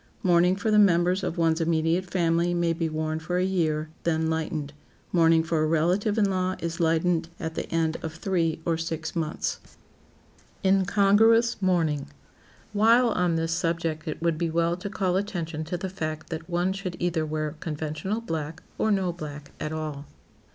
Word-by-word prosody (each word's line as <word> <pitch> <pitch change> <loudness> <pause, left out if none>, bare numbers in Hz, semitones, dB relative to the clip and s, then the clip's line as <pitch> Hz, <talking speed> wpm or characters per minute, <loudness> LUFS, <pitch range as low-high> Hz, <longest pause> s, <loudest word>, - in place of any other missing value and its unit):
Mourning 180 0 +4
for 205 +3 -1
the 210 - +5
members 180 -1 +4
of 170 - -2
one's 165 0 +2
immediate 165 +2 +1
family 170 -1 +1
may 170 -1 +1
be 165 0 -2
worn 155 0 -2
for 175 +3 -2
a 180 - +2
year, 155 -5 0
then 160 -1 0
lightened. 155 -2 -3 0.4
Mourning 165 -2 +4
for 160 -1 0
a 155 - +2
relative 180 +7 +1
in 210 -2 +4
law 185 -1 0
is 170 -1 -4
lightened 165 0 +1
at 160 0 -4
the - - -4
end 165 -1 +1
of 160 -1 -5
three 165 -2 0
or 165 -1 0
six 160 -1 -4
months. 160 -2 -2 1.0
[Sidenote: 195 0 +4
INCONGRUOUS 220 +4 +4
MOURNING] 165 -6 +1 0.7
While 230 +4 +5
on 180 -5 +1
this 165 0 -1
subject 165 -2 -1
it 155 +1 -4
would 165 -2 +1
be 170 -1 0
well 170 +1 +1
to 185 +3 -6
call 190 -2 0
attention 170 -6 -3
to 175 +3 -3
the 190 - -4
fact 155 -4 -5
that 160 +1 -5
one 175 +2 +1
should 190 -2 -5
either 175 -2 0
wear 155 -1 -2
conventional 155 +7 -3
black, 160 -5 -4 0.2
or 220 - +2
no 190 -4 +1
black 150 -3 -8
at 150 - -3
all. 155 -2 -5
165 Hz, 180 wpm, -26 LUFS, 160-185 Hz, 1.0 s, the